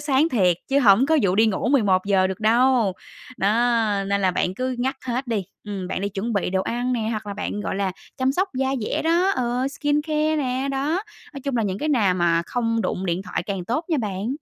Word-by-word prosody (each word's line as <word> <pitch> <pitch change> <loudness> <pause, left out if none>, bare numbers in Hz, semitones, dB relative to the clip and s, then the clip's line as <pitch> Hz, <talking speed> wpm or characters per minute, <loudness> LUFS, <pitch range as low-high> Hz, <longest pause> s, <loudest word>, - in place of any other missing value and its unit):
sáng 285 +2 +2
thiệt 185 - +2
chứ 275 +1 +3
hổng 230 +1 +5
có 320 0 +3
vụ 185 -2 +2
đi 220 +3 +4
ngủ 215 +2 0
11:00 195 -6 +3
được 190 +1 -5
đâu. 235 -1 +3 0.5
Đó, 195 - +2 0.6
nên 200 0 0
là 190 - +3
bạn 180 +1 -1
cứ 255 +4 -2
ngắt 265 +2 -1
hết 255 +2 -2
đi, 220 -5 -1 0.2
ừm, 195 -3 -5
bạn - - -3
đi 200 - -1
chuẩn 205 +4 -3
bị 200 -3 0
đồ 190 0 0
ăn 245 +4 -2
nè 225 -3 -1
hoặc 215 -1 -4
là 200 - -4
bạn, 205 - -4
gọi - - -3
là, 195 -2 -1 0.2
chăm 260 +1 +1
sóc 375 +7 0
da 265 +1 0
dẻ 215 - -2
đó, 340 +4 +2
ừ, 250 +1 0
skincare 300 +2 0
nè, 260 -1 -1
đó. 295 +7 -1 0.3
Nói 275 - -7
chung 275 -3 -1
là 230 - +1
những 195 -1 -2
cái 305 - -2
nào 215 -11 +3
mà 170 -1 +2
không 230 -2 -1
đụng 185 0 -2
điện 175 +2 -1
thoại 180 -2 -3
càng 195 -3 -3
tốt 245 - -2
nha 325 - +1
bạn. 205 -2 -3
230 Hz, 235 wpm, -23 LUFS, 195-270 Hz, 0.6 s, hổng